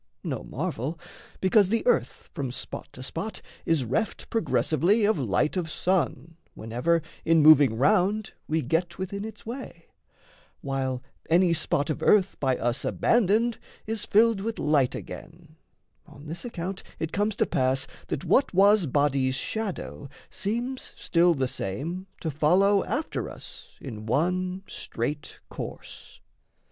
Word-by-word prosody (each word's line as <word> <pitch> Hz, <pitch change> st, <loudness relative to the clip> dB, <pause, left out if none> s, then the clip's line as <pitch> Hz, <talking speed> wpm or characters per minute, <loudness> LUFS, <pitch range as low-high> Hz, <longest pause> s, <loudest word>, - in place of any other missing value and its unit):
No -, -, -3 dB
marvel: 145 Hz, +8 st, -4 dB, 0.4 s
Because 190 Hz, +1 st, +4 dB
the 230 Hz, +2 st, 0 dB
earth 485 Hz, -2 st, +1 dB
from 140 Hz, -6 st, -3 dB
spot -, -, -5 dB
to 130 Hz, -, -9 dB
spot 180 Hz, +10 st, -5 dB, 0.3 s
is 160 Hz, -6 st, +2 dB
reft 215 Hz, -, -2 dB
Progressively 205 Hz, -, +2 dB
of 210 Hz, -6 st, +2 dB
light 125 Hz, -, +1 dB
of 175 Hz, -3 st, -2 dB
sun, 165 Hz, -3 st, -1 dB, 0.2 s
whenever 125 Hz, +9 st, 0 dB, 0.2 s
In 165 Hz, -2 st, +4 dB
moving 145 Hz, -7 st, +7 dB
round 200 Hz, -, +2 dB
we 160 Hz, +1 st, 0 dB
get 165 Hz, +7 st, -1 dB
within 195 Hz, +2 st, -4 dB
its 220 Hz, +1 st, -9 dB
way, 230 Hz, -8 st, -8 dB, 0.7 s
While 130 Hz, -2 st, -2 dB, 0.3 s
any 170 Hz, +1 st, +4 dB
spot 155 Hz, -2 st, 0 dB
of -, -, -4 dB
earth 200 Hz, -3 st, +3 dB
by 130 Hz, -2 st, +1 dB
us 120 Hz, +3 st, -1 dB
abandoned 230 Hz, +1 st, +2 dB, 0.3 s
Is 220 Hz, -1 st, -2 dB
filled 220 Hz, -1 st, +4 dB
with 225 Hz, +2 st, -3 dB
light 145 Hz, -4 st, +2 dB
again, 160 Hz, -1 st, -10 dB, 0.5 s
on 145 Hz, -, -14 dB
this 165 Hz, +6 st, -6 dB
account 190 Hz, -4 st, -4 dB, 0.2 s
It 160 Hz, 0 st, -3 dB
comes 205 Hz, +1 st, 0 dB
to -, -, +2 dB
pass 130 Hz, +1 st, +1 dB, 0.2 s
that 140 Hz, -, -3 dB
what 265 Hz, -8 st, +3 dB
was 200 Hz, -1 st, +5 dB
body's 135 Hz, -1 st, +2 dB
shadow 195 Hz, -5 st, -4 dB, 0.2 s
Seems 240 Hz, +6 st, -3 dB
still 170 Hz, 0 st, +3 dB
the 135 Hz, -2 st, 0 dB
same 160 Hz, -, -4 dB
to 160 Hz, -, -2 dB
follow 185 Hz, +7 st, +4 dB
after 305 Hz, +2 st, -2 dB
us -, -, -10 dB
In 110 Hz, -5 st, -8 dB
one 180 Hz, -, 0 dB
straight 145 Hz, +6 st, -5 dB
course. -, -, -8 dB
170 Hz, 140 wpm, -27 LUFS, 140-200 Hz, 0.7 s, moving